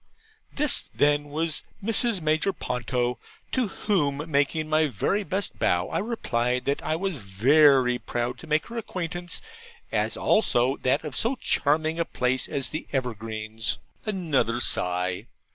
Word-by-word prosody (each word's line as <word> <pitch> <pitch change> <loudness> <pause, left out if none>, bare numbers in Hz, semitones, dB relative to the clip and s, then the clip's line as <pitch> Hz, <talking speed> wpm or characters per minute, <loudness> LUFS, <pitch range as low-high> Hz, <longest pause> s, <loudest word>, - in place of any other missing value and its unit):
This, 300 +1 +4
then, 145 0 +3
was 155 +2 -1 0.2
Mrs. 225 -1 +1
Major 155 +5 +1
Ponto; 125 - -2 0.3
to 255 -3 +1
whom 150 -9 0
making 145 +2 +1
my 155 0 +3
very 145 - 0
best 195 +1 -3
bow, 90 0 +1
I - - -1
replied, 125 - -1
that 140 +1 0
I 155 - -1
was 175 -5 -3
very 125 +5 +4
proud 120 0 -3
to 165 - -11
make 155 +1 +1
her 235 - -8
acquaintance, 175 -4 -5 0.5
as - - 0
also 130 - +2
that 130 +4 +1
of 150 -4 -6
so 235 +4 +2
charming 155 - +1
a 170 - +1
place 125 -2 0
as 135 -2 -2
the 155 - -5
Evergreens. 110 -3 -3 0.3
Another 160 - 0
sigh. 90 0 +1
145 Hz, 145 wpm, -26 LUFS, 125-170 Hz, 0.5 s, This